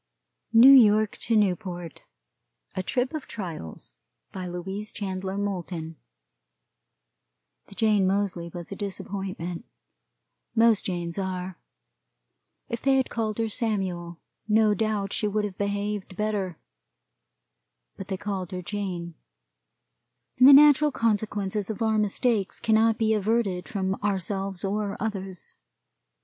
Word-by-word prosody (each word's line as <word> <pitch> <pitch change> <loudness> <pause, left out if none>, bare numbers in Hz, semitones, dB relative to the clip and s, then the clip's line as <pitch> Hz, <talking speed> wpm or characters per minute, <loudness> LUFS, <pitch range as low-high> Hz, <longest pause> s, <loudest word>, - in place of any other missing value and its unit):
NEW 235 +4 +9
YORK 215 -4 +6
TO 230 - 0
NEWPORT. 180 -5 -1 0.7
A 185 - -1
Trip 250 - -1
of 310 -3 -5
Trials. 165 - -7 0.4
BY 185 -2 -5
LOUISE 190 +4 -5
CHANDLER 190 -1 -4
MOULTON. 175 -5 -4 1.7
The - - -14
Jane 210 -4 +3
Moseley 190 -3 -1
was 175 0 -8
a - - -4
disappointment 190 -3 -5 0.9
most 225 -2 +4
Janes 175 -1 -3
are. 185 -1 -4 1.1
If 235 - -4
they 270 -1 +3
had 265 - 0
called 220 -2 -2
her 225 -1 0
Samuel, 190 -7 -2 0.3
no 215 0 +4
doubt 205 -1 -1
she 210 - 0
would 210 0 0
have 195 -3 -7
behaved 200 -1 -3
better; 205 -5 -2 1.4
but 195 - -8
they 190 - -3
called 190 -3 -4
her 180 0 -4
Jane, 180 -4 -4 1.3
and 255 - +9
the - - +10
natural 295 +1 +7
consequences 210 -3 -1
of 220 +1 -3
our 220 -1 +2
mistakes 210 0 0
cannot 225 0 +3
be 220 -1 +2
averted 205 -5 0
from 190 -2 -1
ourselves 195 -1 -2
or 205 0 -2
others. 195 -4 -5
200 Hz, 120 wpm, -26 LUFS, 185-215 Hz, 1.7 s, the